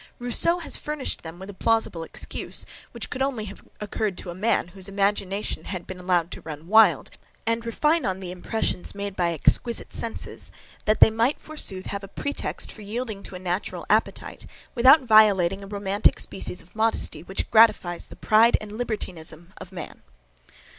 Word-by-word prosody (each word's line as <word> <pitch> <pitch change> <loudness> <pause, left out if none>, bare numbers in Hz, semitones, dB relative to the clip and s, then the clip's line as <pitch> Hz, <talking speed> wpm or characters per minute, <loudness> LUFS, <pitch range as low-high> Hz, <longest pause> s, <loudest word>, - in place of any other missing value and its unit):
Rousseau 245 +8 +4
has 345 - 0
furnished 300 -2 -3
them 165 +1 -9
with 190 +2 -8
a - - -14
plausible 225 -4 0
excuse, 165 - -3 0.2
which - - -4
could 255 - -4
only 260 -5 -1
have 200 0 -10 0.2
occurred 210 -2 -2
to 175 - -6
a - - -6
man, 205 -1 0
whose 190 +1 -3
imagination 200 0 -1
had 180 -3 -5
been 185 -1 -8
allowed 180 -1 +1
to - - -6
run 155 0 -8
wild, 220 +3 +5 0.3
and 230 0 0
refine 300 +7 +2
on 190 -3 -1
the 185 -2 -6
impressions 180 +1 -2
made 200 -1 -5
by 175 -2 +1
exquisite 230 - +1
senses, 230 - -4 0.3
that 215 0 +2
they - - +9
might, 230 +6 +1
forsooth 195 -12 -3
have 200 0 -5
a - - -7
pretext 285 +8 -3
for 215 - -12
yielding 215 0 -4
to 190 - -10
a - - -4
natural 180 +1 -3
appetite - - -1 0.3
without 265 +4 +7
violating 200 -5 +5
a - - -9
romantic 200 0 +1
species 180 -2 -4
of 175 - -24
modesty, 220 -8 0
which 190 +3 -5
gratifies 215 -6 +4
the - - -12
pride 225 +2 +4
and 215 -1 -9
libertinism 175 -7 -5
of 190 - -10
man. 185 - -8
200 Hz, 175 wpm, -25 LUFS, 185-225 Hz, 0.3 s, they